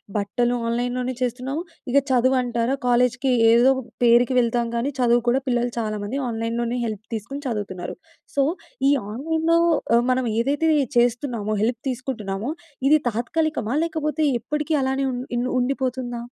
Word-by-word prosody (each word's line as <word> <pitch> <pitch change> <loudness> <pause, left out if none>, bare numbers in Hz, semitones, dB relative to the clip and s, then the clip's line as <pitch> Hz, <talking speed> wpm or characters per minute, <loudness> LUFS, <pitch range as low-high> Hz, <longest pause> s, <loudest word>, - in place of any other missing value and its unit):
బట్టలు 240 +4 0
ఆన్‌లైన్‌లోనే 245 +2 -1
చేస్తున్నాము. 255 +5 -2 0.3
ఇక 275 - +4
చదువు 255 +1 +3
అంటారా! 240 +1 0
కాలేజ్‌కి 250 +2 +2 0.2
ఏదో 240 +3 +6 0.3
పేరుకి 240 +2 +5
వెళ్తాం 235 0 +1
కానీ 235 +4 0
చదువు 240 -1 +3
కూడా 255 +3 +3
పిల్లలు 245 -1 +1
చాలామంది 215 +3 -3
ఆన్‌లైన్‌లోనే 230 +1 -2
హెల్ప్ 215 -1 -4
తీసుకొని 255 +7 -6
చదువుతున్నారు. 205 -6 -4 0.4
సో, 280 - +4 0.5
ఈ - - +5 0.2
ఆన్‌లైన్‌లో 320 +6 +1 0.4
ఆహ్, 240 - +2
మనం 255 0 +1
ఏదైతే 290 +6 +1 0.3
చేస్తున్నామో, 240 -3 +1
హెల్ప్ 235 +1 -1
తీసుకుంటున్నామో 235 -2 -3 0.4
ఇది 305 +1 +6
తాత్కాలికమా 250 +1 -1
లేకపోతే 310 -2 -2 0.3
ఎప్పటికి 300 +1 -2
అలానే 265 +1 0
ఉన్ 245 -1 -3 0.2
ఇన్ 240 - 0
ఉండిపోతుందా? 255 -1 -2
245 Hz, 130 wpm, -23 LUFS, 235-265 Hz, 0.5 s, ఏదో